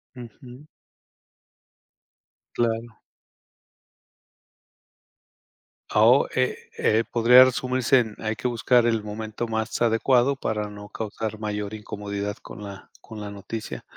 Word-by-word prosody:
Ujú. 125 +3 -12 1.9
Claro. 115 -1 -2 2.9
Ah, 105 - +3
oh, 125 +4 +5
eh 130 0 +1 0.2
eh, 110 +1 +2
podría 125 +2 +7
resumirse 130 0 +2
en 110 -3 -3
hay 110 0 -2
que 125 - -3
buscar 120 0 +2
el 115 -2 +1
momento 110 +2 -5
más 110 +1 -3
adecuado 120 +3 +3
para 105 -5 -3
no 105 0 -11
causar 110 0 -5
mayor 105 -1 -4
incomodidad 105 -1 -5
con 105 - -10
la 100 -1 -10
con 110 -2 -10
la 105 -1 -6
noticia, 105 +2 -7
110 Hz, 110 wpm, -24 LUFS, 105-120 Hz, 2.9 s, podría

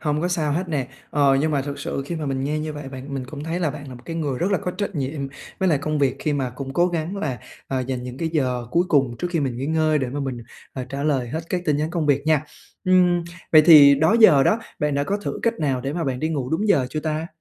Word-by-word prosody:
Hông 150 -1 0
có 175 - 0
sao 155 -5 0
hết 180 +3 -2
nè! 140 -5 -2 0.2
Ờ, 140 -2 +3
nhưng 155 +2 +1
mà 140 -3 0
thực 140 0 -5
sự 140 - -3
khi 170 - -4
mà 155 -2 -4
mình 135 0 -2
nghe 150 +2 -1
như 155 0 -4
vậy 145 -2 -7
bạn 135 +1 -8
mình 130 -2 -3
cũng 145 +1 -8
thấy 170 +2 -3
là 155 -4 +1
bạn 140 0 -9
là 130 - -8
một 120 - -13
cái 165 +3 -5
người 145 -6 -2
rất 190 +4 0
là 190 - +3
có 180 - -3
trách 205 0 -4
nhiệm 140 0 -3 0.3
với 190 - +2
lại 150 -5 +3
công 155 +1 -2
việc, 135 -2 +1
khi 150 - -1
mà 135 -3 -1
cũng 135 +2 -7
cố 175 +5 +3
gắng 175 +2 -3
là, 135 -10 -3 0.3
ờ, 130 -1 -1
dành 125 -1 -3
những 125 +1 -7
cái 165 +1 -1
giờ 125 -6 0
cuối 175 +2 +2
cùng 135 -6 +2
trước 175 - -2
khi 165 - 0
mình 130 -4 -2
nghỉ 135 - -3
ngơi 155 -1 +2
để 130 -2 -2
mà 145 +2 -3
mình, 130 -3 -3 0.3
ờ, 130 -2 -5
trả 140 +1 -4
lời 135 -5 0
hết 160 +6 -3
các 180 -1 -1
tin 150 -3 +2
nhắn 155 +2 -1
công 170 -3 -1
việc 140 +1 +1
nha. 155 -2 +3 0.4
Ừm, 180 -2 +3 0.3
vậy 155 -1 +8
thì 145 -4 +9
đó 160 +7 +3
giờ 145 -10 +8
đó, 215 - +3 0.2
bạn 150 -1 0
đã 140 - 0
có 200 +7 -1
thử 205 - -5
cách 230 - +2
nào 135 -4 0
để 135 +2 -3
mà 170 0 -2
bạn 130 -2 -2
đi 155 - 0
ngủ 140 -5 -3
đúng 200 +7 0
giờ 135 -10 +3
chưa 155 - -3
ta? 155 +1 -2
150 Hz, 300 wpm, -23 LUFS, 135-160 Hz, 0.4 s, thì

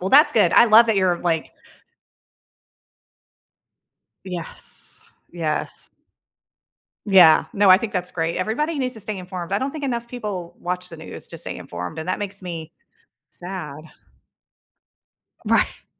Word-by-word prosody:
Well 190 +2 -2
that's 295 +3 +7
good, - - +4
I - - +8
love 230 0 +7
that 225 -2 +1
you're 185 -2 +2
like 165 -2 -1 2.7
Yes. 180 -3 -5 0.3
Yes. 160 -3 -3 1.2
Yeah. 180 -6 +7
No, 200 -2 +5
I 185 - +9
think 220 -1 -5
that's 180 -1 -2
great. 165 0 -2
Everybody 285 - -1
needs 255 -1 -1
to 220 - -5
stay 210 0 -3
informed, 180 -1 -6
I 200 - +2
don't 265 +5 -2
think 295 0 -6
enough 235 -3 -3
people 205 -8 -6
watch 180 0 -3
the 165 - -9
news 160 - -6
to - - -8
stay - - -4
informed, 90 - -7
and 160 - -7
that - - 0
makes 200 -1 -5
me 165 -3 -7 0.6
sad. 175 -6 -6 1.7
Righ - - +1
185 Hz, 145 wpm, -22 LUFS, 170-220 Hz, 2.7 s, I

